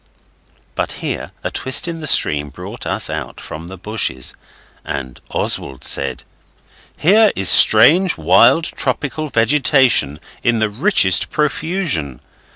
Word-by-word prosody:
But -, -, -4 dB
here -, -, -6 dB
a -, -, -4 dB
twist 130 Hz, +6 st, +2 dB
in 165 Hz, -1 st, -6 dB
the 155 Hz, -, -4 dB
stream 75 Hz, -, +3 dB
brought 70 Hz, -, -10 dB
us -, -, 0 dB
out -, -, -7 dB
from 80 Hz, +2 st, -10 dB
the 95 Hz, +1 st, -11 dB
bushes, 90 Hz, -, -3 dB, 0.5 s
and 65 Hz, -2 st, -7 dB
Oswald 65 Hz, -, -3 dB
said 65 Hz, -2 st, 0 dB, 0.7 s
'Here 210 Hz, +6 st, +3 dB
is 95 Hz, -2 st, +1 dB
strange, 180 Hz, +2 st, +5 dB
wild, 100 Hz, -, +3 dB
tropical 155 Hz, -1 st, -4 dB
vegetation 125 Hz, -, +2 dB, 0.2 s
in 120 Hz, -1 st, 0 dB
the 110 Hz, -1 st, -1 dB
richest 120 Hz, -, +2 dB
profusion. 150 Hz, -, -3 dB
115 Hz, 125 wpm, -16 LUFS, -, 0.7 s, strange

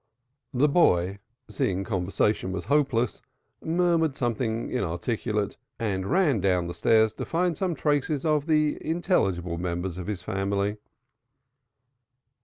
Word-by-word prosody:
The 135 Hz, +3 st, +3 dB
boy, 100 Hz, -, +3 dB, 0.3 s
seeing 100 Hz, -2 st, -1 dB
conversation 95 Hz, 0 st, 0 dB
was 95 Hz, -1 st, -4 dB
hopeless, 130 Hz, -3 st, +1 dB, 0.4 s
murmured 165 Hz, -3 st, +1 dB
something 115 Hz, -2 st, -2 dB
inarticulate 105 Hz, +4 st, -2 dB, 0.2 s
and 95 Hz, -4 st, -2 dB
ran 165 Hz, -, +3 dB
down 90 Hz, -2 st, +2 dB
the 85 Hz, -, -4 dB
stairs 110 Hz, +5 st, +3 dB
to -, -, -5 dB
find 175 Hz, 0 st, 0 dB
some 180 Hz, -1 st, -1 dB
traces 145 Hz, -1 st, 0 dB
of 150 Hz, -1 st, +1 dB
the 155 Hz, -2 st, +2 dB
intelligible 95 Hz, -, 0 dB
members 90 Hz, 0 st, -3 dB
of 90 Hz, -, -6 dB
his 100 Hz, -4 st, -4 dB
family. 100 Hz, +2 st, -1 dB
110 Hz, 120 wpm, -26 LUFS, 95-150 Hz, 0.4 s, The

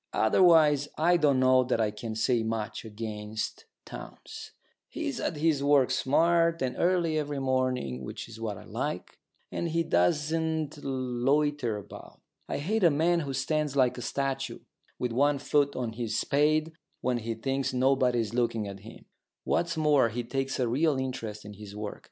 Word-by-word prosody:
Otherwise 150 Hz, +2 st, +5 dB
I 170 Hz, +3 st, +4 dB
don't 145 Hz, -6 st, +3 dB
know 130 Hz, 0 st, +5 dB
that 120 Hz, -, 0 dB
I 110 Hz, -2 st, +1 dB
can 110 Hz, +1 st, -6 dB
say 115 Hz, +2 st, +1 dB
much 110 Hz, -1 st, -3 dB
against 110 Hz, -1 st, -5 dB, 0.2 s
Townes. -, -, -10 dB, 0.4 s
He's -, -, -4 dB
at -, -, -2 dB
his 150 Hz, -2 st, +1 dB
work 140 Hz, -3 st, +4 dB
smart 165 Hz, +4 st, +2 dB
and 125 Hz, -1 st, -2 dB
early 170 Hz, -3 st, +2 dB
every 145 Hz, -1 st, -3 dB
morning, 130 Hz, -, -1 dB
which -, -, -7 dB
is 115 Hz, -1 st, -11 dB
what 105 Hz, -3 st, -3 dB
I -, -, -11 dB
like; -, -, -5 dB, 0.3 s
and 170 Hz, -, -2 dB
he 165 Hz, +1 st, +1 dB
doesn't 155 Hz, -, 0 dB
loiter 130 Hz, -1 st, 0 dB
about. 100 Hz, -, -11 dB, 0.3 s
I -, -, -1 dB
hate 200 Hz, +9 st, -1 dB
a 170 Hz, -, +7 dB
man 165 Hz, +4 st, +2 dB
who 140 Hz, -4 st, -4 dB
stands 150 Hz, +2 st, -1 dB
like 130 Hz, -3 st, +3 dB
a 125 Hz, -, -7 dB
statue, 135 Hz, +1 st, -3 dB, 0.4 s
with 125 Hz, -1 st, -2 dB
one 140 Hz, +4 st, +2 dB
foot 140 Hz, 0 st, +1 dB
on 120 Hz, -3 st, -3 dB
his 115 Hz, -1 st, -3 dB
spade, 155 Hz, +3 st, +2 dB, 0.3 s
when 125 Hz, -1 st, 0 dB
he 115 Hz, 0 st, -4 dB
thinks 135 Hz, +4 st, -1 dB
nobody 130 Hz, -1 st, +2 dB
is 110 Hz, -1 st, -4 dB
looking 115 Hz, -3 st, 0 dB
at 100 Hz, 0 st, -7 dB
him. 110 Hz, +3 st, -13 dB, 0.4 s
What's 170 Hz, -1 st, 0 dB
more, 150 Hz, -6 st, +4 dB
he 120 Hz, +2 st, -3 dB
takes 135 Hz, +3 st, -3 dB
a 125 Hz, -, +1 dB
real 145 Hz, +4 st, +2 dB
interest 115 Hz, -5 st, -4 dB
in 105 Hz, -, -8 dB
his 105 Hz, 0 st, -10 dB
work. 105 Hz, 0 st, -5 dB
130 Hz, 170 wpm, -28 LUFS, 115-150 Hz, 0.4 s, a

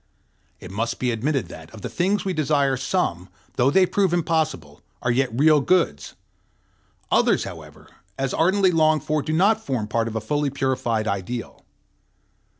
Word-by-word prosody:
It 90 Hz, -, -10 dB
must 115 Hz, +4 st, -2 dB
be 125 Hz, -1 st, 0 dB
admitted 125 Hz, -, -1 dB
that, 80 Hz, -2 st, -11 dB
of 105 Hz, -, -12 dB
the -, -, -2 dB
things 195 Hz, +4 st, 0 dB
we 190 Hz, -, -1 dB
desire, 140 Hz, -3 st, +1 dB
some, 125 Hz, -, -2 dB, 0.3 s
though 125 Hz, +2 st, +3 dB
they 185 Hz, +6 st, +4 dB
prove 190 Hz, -1 st, +1 dB
impossible, 155 Hz, -, -2 dB, 0.2 s
are 120 Hz, -, +1 dB
yet 130 Hz, +2 st, +1 dB
real 150 Hz, +5 st, +4 dB
goods; 165 Hz, -, 0 dB, 1.0 s
others, -, -, +3 dB
however, -, -, -10 dB, 0.3 s
as 135 Hz, -1 st, -2 dB
ardently 190 Hz, +2 st, +3 dB
longed 155 Hz, -3 st, +2 dB
for, 155 Hz, 0 st, 0 dB
do 155 Hz, -, -4 dB
not 205 Hz, +7 st, +2 dB
form 125 Hz, -6 st, -2 dB
part 115 Hz, +1 st, -1 dB
of 115 Hz, -, -6 dB
a -, -, 0 dB
fully 145 Hz, +6 st, -1 dB
purified 125 Hz, -5 st, -1 dB
ideal. 100 Hz, +5 st, -4 dB
135 Hz, 160 wpm, -23 LUFS, 115-160 Hz, 1.0 s, they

